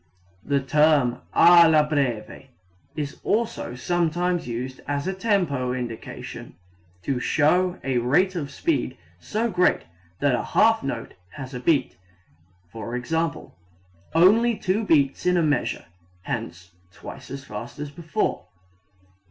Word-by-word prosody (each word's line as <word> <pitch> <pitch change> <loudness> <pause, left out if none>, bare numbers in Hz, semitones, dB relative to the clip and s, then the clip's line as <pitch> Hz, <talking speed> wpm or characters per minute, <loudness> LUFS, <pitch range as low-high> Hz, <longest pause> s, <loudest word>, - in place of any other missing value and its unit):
The 140 -1 +1
term 145 -2 +3
alla 170 -3 +7
breve 140 -7 -2 0.5
is 145 -2 -5
also 220 - -1
sometimes 175 +3 0
used 125 +2 -5
as 145 0 -2
a 190 - -1
tempo 175 - 0
indication, 120 -3 -7 0.5
to 135 -3 -1
show 175 +8 +2
a 130 -2 0
rate 170 +11 +2
of 150 -5 -3
speed 140 -3 -1 0.2
so 220 - -2
great 180 -1 +2 0.4
that 140 -2 +2
a 120 - +1
half 225 0 +3
note 120 -4 -5 0.2
has 135 -2 -8
a 125 - -4
beat, 135 0 +1 0.8
i.e., 125 +9 -3 0.7
only 220 +8 +5
two 200 +3 0
beats 145 -4 +2
in 180 0 +3
a 170 - +3
measure 150 -2 0 0.4
hence 95 -7 -5 0.2
twice - - -11
as 135 0 -7
fast - - -8
as 150 0 -6
before. 170 +6 -2
150 Hz, 125 wpm, -24 LUFS, 130-175 Hz, 0.8 s, alla